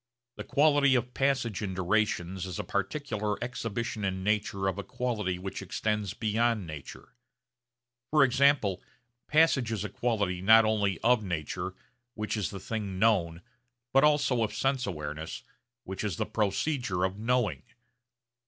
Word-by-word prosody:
The - - -5
quality 145 -2 +4
of 125 0 -1
passage 135 -7 0
in 95 -3 -3
durations 95 -1 0
is 90 - -5
a - - -2
particular 105 - -2
exhibition 115 -2 -4
in 95 -1 -2
nature 100 -2 0
of 95 +1 -1
a - - -3
quality 105 -4 -2
which 95 +2 -6
extends 105 -3 -2
beyond 110 -1 +1
nature. 80 - -9 1.0
For 150 -2 +5
example 135 -7 +3 0.5
passage 150 -6 +3
is 105 -3 -2
a 105 - -4
quality 100 -7 -1
not 110 +3 +7
only 100 -4 +1
of 120 -1 +3
nature, 85 -6 -4 0.4
which 105 +1 -2
is 105 -3 -1
the 100 - -7
thing 100 -2 -4
known, 90 -6 +2 0.5
but 135 +1 +5
also 145 -5 +3
of 110 - -1
sense 135 -3 0
awareness 75 -2 -5 0.4
which 95 +2 -5
is 100 -7 -2
the - - 0
procedure 105 - -1
of 95 +2 -1
knowing. 115 - 0
105 Hz, 145 wpm, -29 LUFS, 95-125 Hz, 1.0 s, not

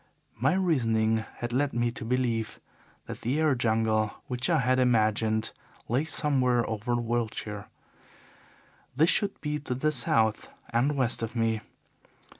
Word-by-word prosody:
My 135 +9 +2
reasoning 115 -12 +1 0.2
had 120 0 -5
led 140 +2 0
me 120 0 0
to - - -8
believe 115 -2 -1 0.5
that - - -8
the 130 +6 -1
air 155 -3 +3
jungle 110 -3 +1
which 125 +2 -2
I 165 - +3
had 130 -1 +2
imagined 110 -2 +1 0.4
lay 130 +7 0
somewhere 130 -6 +1
over 110 +2 -2
Wiltshire. 115 -3 -3 1.3
This 160 +5 +4
should 200 -1 0
be 150 0 -2
to 130 -3 -4
the 155 +4 0
south 115 -5 +3 0.2
and 125 +5 +1
west 125 -3 +1
of 115 +1 -4
me. 115 -1 0
120 Hz, 140 wpm, -27 LUFS, 110-135 Hz, 1.3 s, This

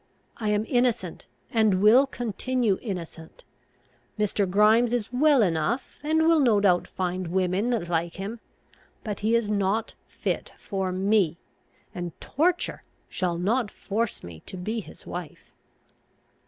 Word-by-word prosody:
I 215 -2 -2
am 210 +1 +1
innocent, 240 -8 0 0.2
and 215 -5 +3
will 235 +7 +6
continue 240 -3 -1
innocent. 170 -6 -7 0.7
Mr. 205 -2 0
Grimes 220 +5 +4
is 240 -1 -2
well 280 -1 +5
enough, 180 - -1
and 315 +2 +2
will 325 0 +5
no 235 -7 +4
doubt 185 -3 +3
find 185 -1 -3
women 185 +5 0
that 225 -8 -1
like 170 0 -1
him; 205 +5 -5 0.6
but 210 -3 -4
he 220 +2 +2
is 235 -2 +1
not 205 +2 0
fit - - -3
for 190 -2 -3
me, 190 -3 +2 0.6
and 175 -2 -6
torture 345 +5 0 0.3
shall 175 -2 -1
not 210 +6 +1
force 220 +3 -3
me 85 -2 -9
to 185 - -7
be 215 +6 -3
his 210 - -12
wife." 175 -4 -8
210 Hz, 140 wpm, -26 LUFS, 185-235 Hz, 0.7 s, will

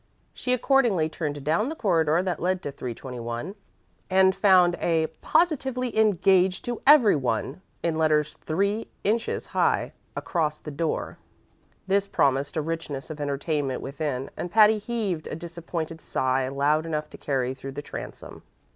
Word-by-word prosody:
She 250 - -3
accordingly 240 - +3
turned 145 -3 -4
down 170 - +1
the 320 - -4
corridor 170 - +2
that 180 -4 -2
led 185 +1 0
to 145 - -4
321, 125 - -6 0.6
and 190 0 +4
found 185 -3 +5
a 165 -2 +2 0.2
"POSITIVELY 265 -7 +1
ENGAGED 190 -3 +3
TO 240 -1 -4
EVERY 275 - +7
ONE!!" 130 +4 -2 0.2
in 165 -2 0
letters 155 -1 +2
three 200 +7 0 0.2
inches 225 +3 0
high, - - 0 0.2
across 155 -3 -1
the 150 - -8
door. 155 +3 -3 0.7
This 195 +1 +1
promised 140 -2 +1
a 155 - 0
richness 160 -3 -4
of 150 -1 -7
entertainment 145 -1 -2
within, 140 -1 -3
and 175 - -4
Patty 215 +2 +5
heaved 205 -8 -3
a - - -4
disappointed 165 -1 -6
sigh 130 0 0
loud 145 +4 +1
enough 150 -1 -2
to - - -10
carry 130 -3 -1
through 135 +1 -8
the 145 +1 -6
transom. - - -8
165 Hz, 145 wpm, -26 LUFS, 145-195 Hz, 0.7 s, EVERY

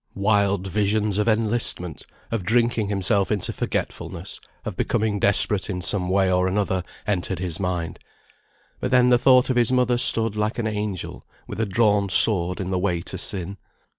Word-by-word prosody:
Wild 100 -1 0
visions 105 +1 -1
of 105 - -1
enlistment, 110 -7 0 0.2
of 115 -3 -2
drinking 115 +1 0
himself 100 0 -1
into 105 -3 -2
forgetfulness, - - -5 0.3
of - - -5
becoming 105 -1 -1
desperate 100 0 +5
in 90 -2 -4
some 90 -1 0
way 95 0 +1
or 90 0 +1
another, 95 -1 -2 0.2
entered 95 -2 -2
his 85 -2 -3
mind; 90 -3 -4 0.8
but - - -3
then 125 -1 +3
the 120 -1 +4
thought 130 0 +3
of 125 - -2
his 120 0 +2
mother 125 -1 +1
stood 115 -3 +4
like 105 +2 -2
an 120 - -3
angel 105 -4 -5 0.2
with - - -8
a 110 - -1
drawn 100 -1 +1
sword 90 -2 +4
in 95 -1 -4
the 90 - -1
way 90 -2 -1
to 95 +1 -8
sin. 95 +1 -4
100 Hz, 170 wpm, -22 LUFS, 95-110 Hz, 0.8 s, desperate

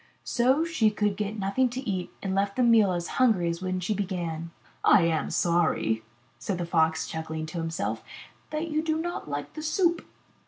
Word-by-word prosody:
So 260 +6 +2
she 310 -10 +2
could 210 -1 0
get 210 +1 -3
nothing 205 +6 +1
to 250 +2 -5
eat 185 -3 -2
and 190 -1 -1
left 200 +1 0
the 255 - +2
meal 225 -5 +5
as 175 -1 -2
hungry 205 -9 +4
as 170 +1 -3
when 185 0 -1
she 180 +4 -1
began. 175 -5 -3 0.3
*'I 185 - +6
am 165 -2 +1
sorry," 165 -10 +1 0.4
said 175 +8 -2
the 175 - -2
Fox, 160 -1 +2
chuckling 160 0 -4
to 160 +2 -5
himself, 165 +3 -3 0.5
''that 310 +1 -3
you 305 0 +1
do 315 -1 0
not 340 - -4
like 145 0 -4
the 310 - -6
soup.'' 340 +2 +1
195 Hz, 190 wpm, -27 LUFS, 170-250 Hz, 0.5 s, I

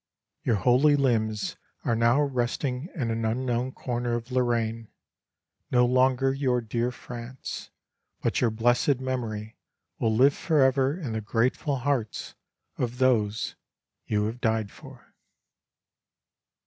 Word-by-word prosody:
"Your 115 - +2
holy 125 +9 +4
limbs 110 -6 0 0.3
are 115 - +2
now 115 +5 +4
resting 130 +2 -2
in 125 -8 -1
an 115 0 -2
unknown 120 +2 0
corner 120 -2 -2
of 120 +2 -5
Lorraine 115 -3 0 0.8
no 125 -1 +4
longer 130 +1 +3
your 130 -3 +1
dear 115 +1 -1
France 125 +1 -8 0.5
but - - 0
your 120 - +4
blessed 120 +4 +2
memory 115 -5 -4 0.4
will 110 -1 +1
live 135 +5 +5
forever 140 0 +2
in 135 -10 -4
the 110 - -2
grateful 120 +6 0
hearts 130 -4 -2 0.5
of 125 0 -2
those 115 -5 +1 0.5
you 105 -1 +1
have 115 +4 -3
died 110 -3 0
for!" - - -15
120 Hz, 120 wpm, -27 LUFS, 115-130 Hz, 0.8 s, live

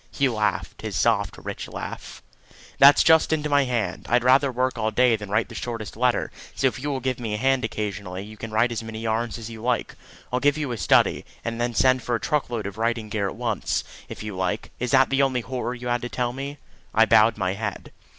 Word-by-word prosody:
He 140 - +1
laughed 110 -4 -2
his - - -5
soft, - - +1
rich - - -6
laugh. - - -8 0.6
"That's 140 +1 +8
just 160 -1 +5
into 150 -1 0
my 145 -1 +4
hand. 115 -8 -2
I'd 120 +1 +3
rather 130 +2 +4
work 130 +1 0
all 110 -1 0
day 120 +1 +3
than 105 -2 -7
write 110 +3 +1
the - - -11
shortest 115 -3 -5
letter; 125 +1 +1 0.2
so - - -1
if 130 - +1
you 145 +3 -3
will 135 -2 -2
give 130 -1 -2
me 110 -3 -3
a - - -2
hand 135 +2 +2
occasionally, 100 -4 -4
you 110 +1 -11
can 115 +1 -7
write 110 +3 +2
as 115 - -3
many 110 -1 -7
yarns 115 +1 -1
as 115 0 -7
you 110 -1 -9
like. 120 0 -1 0.4
I'll 125 - +2
give 145 +2 +2
you 145 -4 -2
a 120 - -3
study, 85 - +3 0.2
and 115 +1 -2
send 130 -1 +4
for 120 +1 -1
a - - -1
truck 150 -5 -1
load 115 -4 -3
of 100 +2 -6
writing 115 -1 -1
gear 105 -2 -1
at - - -8
once, 115 -4 -1 0.3
if - - -7
you 105 -2 -5
like. 95 +4 -2
Is 125 - -2
that 135 +1 +4
the 135 0 +3
only 130 -2 +1
horror 125 0 -4
you 125 0 -7
had 120 0 0
to 120 - -4
tell 120 -1 -2
me?" 140 +2 -6 0.4
I - - +6
bowed 110 +2 +5
my 95 -2 0
head. 105 0 -5
120 Hz, 240 wpm, -24 LUFS, 110-130 Hz, 0.6 s, That's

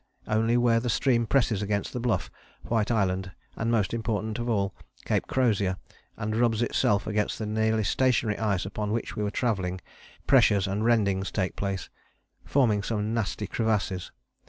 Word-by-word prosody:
Only 115 +2 +2
where 120 -1 +3
the 120 +1 -2
stream 120 -1 +2
presses 115 -6 +2
against 100 0 -2
the 125 - -3
Bluff, 120 -1 -1 0.3
White 115 -2 0
Island 95 -4 0 0.2
and, 115 - -2
most 115 -3 +1
important 110 -1 -2
of 120 +1 -2
all, 100 -4 0 0.3
Cape - - 0
Crozier, 105 -8 +1 0.4
and 110 -1 -2
rubs 115 -1 +2
itself 105 -3 +1
against 105 -1 -1
the 110 - -4
nearly 110 +1 +1
stationary 120 -1 +1
ice 100 -5 0
upon 105 +1 -3
which 115 - -3
we - - -3
were 105 - 0
travelling, 95 -6 -1 0.5
pressures 105 -7 +4
and 100 +2 -1
rendings 100 -5 +2
take 95 -3 -1
place, 95 -3 -3 0.6
forming 115 -7 +2
some 105 +1 -2
nasty 110 -2 -2
crevasses. 105 -5 -1
110 Hz, 160 wpm, -27 LUFS, 100-115 Hz, 0.6 s, pressures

